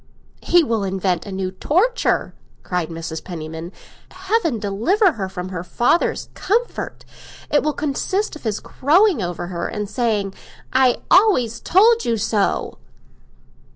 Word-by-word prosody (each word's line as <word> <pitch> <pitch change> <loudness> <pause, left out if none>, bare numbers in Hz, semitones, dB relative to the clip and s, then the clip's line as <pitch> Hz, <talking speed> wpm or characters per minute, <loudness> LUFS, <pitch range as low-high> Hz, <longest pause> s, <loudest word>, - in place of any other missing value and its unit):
"He 350 -1 +4
will 230 -7 -1
invent 190 -1 -1
a - - -6
new 190 -1 -3
torture!" 370 - +1 0.3
cried 180 -3 -2
Mrs. 165 -1 -6
Penniman. 160 0 -7 0.4
"Heaven 375 - -1
deliver 230 - +2
her 195 -9 -4
from 185 -1 -6
her 180 -2 -5
father's 240 - +1
comfort. 465 +5 -2 0.5
It 290 - +4
will 305 - 0
consist 310 +9 -2
of 310 - -10
his 215 -3 -2
crowing 330 - +2
over 175 -1 -3
her 175 -2 -3
and 210 -1 -4
saying, 210 -4 -1 0.4
'I 260 -1 +3
always 255 - +4
told 455 +5 +4
you 230 -1 0
so! 210 -1 -1
225 Hz, 135 wpm, -21 LUFS, -, 0.5 s, He